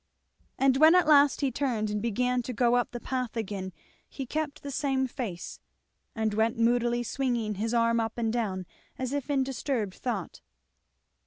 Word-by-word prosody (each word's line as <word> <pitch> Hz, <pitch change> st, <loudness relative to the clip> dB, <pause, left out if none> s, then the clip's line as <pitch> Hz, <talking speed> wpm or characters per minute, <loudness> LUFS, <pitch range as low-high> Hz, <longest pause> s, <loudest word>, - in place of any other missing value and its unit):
And 265 Hz, -1 st, +3 dB
when 315 Hz, +4 st, +7 dB
at 360 Hz, -, +5 dB
last 290 Hz, -2 st, +5 dB
he 275 Hz, -2 st, +1 dB
turned 230 Hz, -5 st, -1 dB
and 210 Hz, 0 st, -2 dB
began 245 Hz, +3 st, 0 dB
to 250 Hz, +1 st, -5 dB
go 240 Hz, +1 st, +2 dB
up 245 Hz, -, +1 dB
the 240 Hz, -, -6 dB
path 250 Hz, -2 st, -3 dB
again 195 Hz, -3 st, -4 dB, 0.4 s
he 270 Hz, -, -6 dB
kept 305 Hz, +2 st, -3 dB
the 285 Hz, -, -5 dB
same 270 Hz, -2 st, 0 dB
face, 220 Hz, -8 st, -6 dB, 0.6 s
and 220 Hz, -2 st, 0 dB
went 225 Hz, +3 st, +1 dB
moodily 240 Hz, +1 st, +2 dB
swinging 240 Hz, -3 st, -1 dB
his 215 Hz, +3 st, -2 dB
arm 230 Hz, -1 st, +2 dB
up 225 Hz, 0 st, -2 dB
and 225 Hz, -1 st, 0 dB
down, 195 Hz, -6 st, -2 dB, 0.3 s
as 260 Hz, +1 st, -3 dB
if 285 Hz, -1 st, -3 dB
in 275 Hz, -2 st, +2 dB
disturbed 255 Hz, -6 st, -2 dB
thought. 220 Hz, -8 st, -4 dB
240 Hz, 175 wpm, -28 LUFS, 220-265 Hz, 0.6 s, when